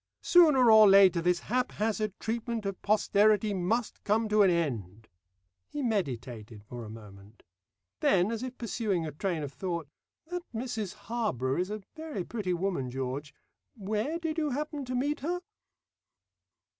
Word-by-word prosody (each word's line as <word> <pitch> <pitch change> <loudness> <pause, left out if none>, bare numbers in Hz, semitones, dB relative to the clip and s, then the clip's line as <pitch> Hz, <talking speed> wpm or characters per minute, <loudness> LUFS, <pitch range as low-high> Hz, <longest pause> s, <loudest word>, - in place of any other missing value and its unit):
Sooner 295 -9 +6
or 215 -2 +8
later 190 -3 +6
this 175 +1 +1
haphazard 215 -3 -1
treatment 230 -1 -3
of 195 -1 -4
posterity 210 0 +3
must 205 +6 -1
come 220 +2 +1
to 210 0 +4
an 195 - +6
end." 115 - -2 0.6
He 290 - -4
meditated 125 - -3
for 120 +3 -8
a 110 - -8
moment. 105 -1 -13 0.6
Then, 190 +2 +3
as 230 -1 -3
if 255 0 -6
pursuing 210 -7 -1
a 155 - -4
train 165 +1 -2
of 140 -1 -6
thought, 170 +2 -4 0.4
"That 355 +2 -4
Mrs 220 -5 -3
Harborough 175 - -1
is 180 +2 -1
a 210 -1 -5
very 315 - -5
pretty 205 -2 -3
woman, 175 -7 -1
George. 135 +3 -4 0.4
Where 215 - -2
did 325 -1 -3
you 305 -2 0
happen 290 +1 -3
to 255 0 -4
meet 285 +4 0
her?" 350 +6 -2
205 Hz, 150 wpm, -29 LUFS, 155-235 Hz, 0.6 s, or